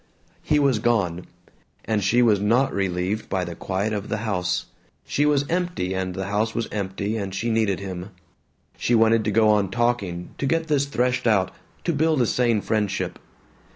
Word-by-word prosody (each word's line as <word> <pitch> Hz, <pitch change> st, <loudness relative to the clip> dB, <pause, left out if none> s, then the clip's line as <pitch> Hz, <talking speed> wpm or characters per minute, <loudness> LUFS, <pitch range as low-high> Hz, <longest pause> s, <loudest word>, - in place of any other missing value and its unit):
He 150 Hz, -, +1 dB
was 140 Hz, -6 st, +3 dB
gone. 100 Hz, -7 st, 0 dB, 0.6 s
And 110 Hz, -2 st, 0 dB
she 120 Hz, +6 st, +4 dB
was 105 Hz, -4 st, +4 dB
not 115 Hz, +7 st, +2 dB
relieved 95 Hz, +2 st, -1 dB
by 95 Hz, -1 st, -1 dB
the 85 Hz, -, -6 dB
quiet 95 Hz, +5 st, -2 dB
of 105 Hz, -1 st, -4 dB
the -, -, -1 dB
house. 90 Hz, -4 st, -1 dB, 0.4 s
She 145 Hz, +1 st, +1 dB
was 145 Hz, -1 st, +2 dB
empty 175 Hz, -, -1 dB
and 95 Hz, -1 st, -3 dB
the 95 Hz, -, -3 dB
house 105 Hz, +3 st, -1 dB
was 115 Hz, -, -1 dB
empty 100 Hz, +1 st, -2 dB
and 100 Hz, -2 st, -4 dB
she 115 Hz, +4 st, -1 dB
needed 110 Hz, -4 st, +1 dB
him. 95 Hz, -1 st, -6 dB, 0.7 s
She 120 Hz, -, +2 dB
wanted 115 Hz, 0 st, +4 dB
to -, -, +1 dB
go 110 Hz, +1 st, +4 dB
on 105 Hz, -3 st, +3 dB
talking, 100 Hz, -6 st, -1 dB
to 140 Hz, -, 0 dB
get 165 Hz, +2 st, 0 dB
this 140 Hz, -2 st, +2 dB
threshed 125 Hz, -2 st, 0 dB
out, 100 Hz, -5 st, +3 dB, 0.3 s
to 170 Hz, -, 0 dB
build 155 Hz, 0 st, +2 dB
a 120 Hz, -, +4 dB
sane 115 Hz, -2 st, +1 dB
friendship. 100 Hz, -5 st, -1 dB
110 Hz, 185 wpm, -24 LUFS, 95-120 Hz, 0.7 s, she